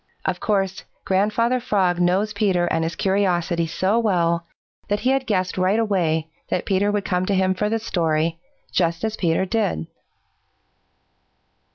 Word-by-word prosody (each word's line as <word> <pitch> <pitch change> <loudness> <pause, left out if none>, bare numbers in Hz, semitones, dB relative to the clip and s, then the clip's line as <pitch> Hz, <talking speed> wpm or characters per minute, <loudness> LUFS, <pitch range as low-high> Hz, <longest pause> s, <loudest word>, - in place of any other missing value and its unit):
Of - - -1
course, 195 -3 -1 0.2
Grandfather 215 +6 +1
Frog 195 -8 +1
knows 190 +4 +2
Peter 195 -4 +1
and 165 -1 0
his 165 +1 -2
curiosity 175 -4 +1
so 190 +7 +1
well 170 -6 +1 0.4
that 205 0 -1
he 255 - +2
had 270 -1 0
guessed 185 -3 0
right 185 +3 +2
away 175 -8 +1 0.2
that - - -1
Peter 200 +1 +1
would 205 -1 -1
come 180 -1 0
to 200 - +1
him 190 0 +2
for 210 +3 -1
the 225 - +1
story, 165 -6 0 0.3
just 170 0 0
as 220 -1 -1
Peter 175 -1 +1
did. 190 - -1
190 Hz, 155 wpm, -22 LUFS, 170-210 Hz, 0.4 s, knows